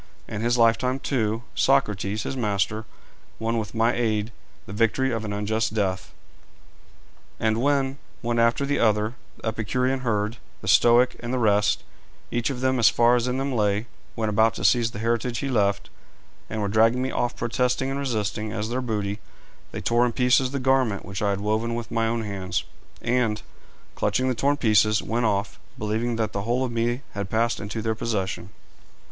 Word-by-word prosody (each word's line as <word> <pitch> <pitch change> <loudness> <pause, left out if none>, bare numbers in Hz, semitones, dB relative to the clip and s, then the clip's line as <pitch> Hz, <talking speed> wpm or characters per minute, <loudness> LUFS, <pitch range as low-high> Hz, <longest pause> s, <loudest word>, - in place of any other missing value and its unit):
In 105 - -4
his 120 +1 +2
lifetime, 120 +3 +3
too, 115 -4 -1
Socrates, 105 -6 +1
his - - -4
master, 105 -2 -1 0.5
won 115 +1 -1
with 110 +1 -6
my 115 +1 +3
aid 110 -2 0 0.3
the 100 - -8
victory 115 +5 +1
of 115 -2 -2
an 105 - -4
unjust 110 +2 -1
death. 95 -3 -1 1.3
And 110 +1 +1
when, 140 0 +1 0.2
one 120 0 0
after 115 +4 +3
the 145 0 0
other, 110 0 +2 0.2
the - - -10
Epicurean 125 +5 -1
herd, 110 -2 -1 0.3
the - - -6
Stoic, 120 +1 +5
and 120 0 -5
the 130 - 0
rest, 105 -3 +2 0.5
each 120 +2 0
of 130 -2 -4
them 130 -1 +1
as 115 - +7
far 120 +1 +4
as 120 0 0
in 125 +1 -1
them 135 0 -1
lay, 105 -1 +1 0.3
went 110 -2 -1
about 110 +2 +3
to 95 - -3
seize 115 +3 +4
the 110 - -9
heritage 115 +2 -1
he 140 - -2
left, 100 -5 0 0.6
and 110 -1 -2
were - - 0
dragging 115 +4 +3
me 130 - -2
off 120 0 -1
protesting 125 +3 0
and 135 - -2
resisting, 110 -5 -2
as 110 0 -3
their 125 +2 -1
booty, 105 -4 -2 0.5
they - - -5
tore 120 +1 +2
in 120 - -3
pieces 125 +1 +3
the 140 - -3
garment 130 -6 +1
which 95 +2 -5
I 105 - +2
had 100 0 -1
woven 110 +3 0
with 120 -1 -5
my 115 -1 +1
own 115 0 -1
hands, 95 -3 -3 0.4
and, 120 -3 +1 0.5
clutching 130 +1 0
the - - +2
torn 140 +4 +1
pieces, 110 -3 +3
went 115 0 0
off, 100 -1 -1 0.2
believing 110 +3 -1
that 110 -1 -1
the 100 - -2
whole 120 +5 0
of 125 - -4
me 120 +3 -1
had 100 -1 -4
passed 115 +2 +1
into 105 +2 -4
their 110 -1 +1
possession. 95 -5 -3
115 Hz, 190 wpm, -25 LUFS, 105-125 Hz, 1.3 s, as